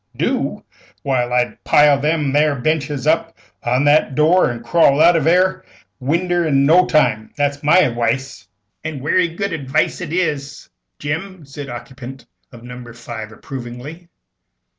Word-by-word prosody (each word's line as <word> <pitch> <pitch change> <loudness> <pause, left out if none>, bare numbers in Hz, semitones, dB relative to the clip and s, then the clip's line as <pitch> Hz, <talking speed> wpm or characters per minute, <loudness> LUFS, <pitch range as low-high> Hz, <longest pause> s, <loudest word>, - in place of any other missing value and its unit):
"Do? - - -2 0.4
Why, 125 -3 0
I'd 125 0 -1
pile 145 -1 +4
them 150 -1 0
'ere 150 0 +3
benches 145 0 -2
up 165 +1 0 0.3
agin 125 +2 +1
that 150 +2 +5
'ere - - -16
door, 160 +5 +3
an' 120 -1 -8
crawl 140 +1 +3
out 175 +2 +6
of 160 -3 +1
that 170 +2 +4
'erc 185 0 0 0.3
winder 175 +6 0
in 140 -4 +2
no 175 +5 +5
time. 110 -8 +1
That's 145 0 -1
my 160 +5 +5
adwice." 120 -3 -2 0.4
"And 155 -4 -5
werry 175 +4 +2
good 185 +3 -4
adwice 145 +2 -1
it 165 -4 -6
is, 150 -6 -3 0.3
Jim," 160 +3 -5
said 140 +1 -9
the 120 - -6
occupant 130 +1 -10 0.3
of 120 -2 -13
No. 125 0 -9
5, 115 -2 -8
approvingly. 135 +8 -9
145 Hz, 160 wpm, -18 LUFS, 125-165 Hz, 0.4 s, out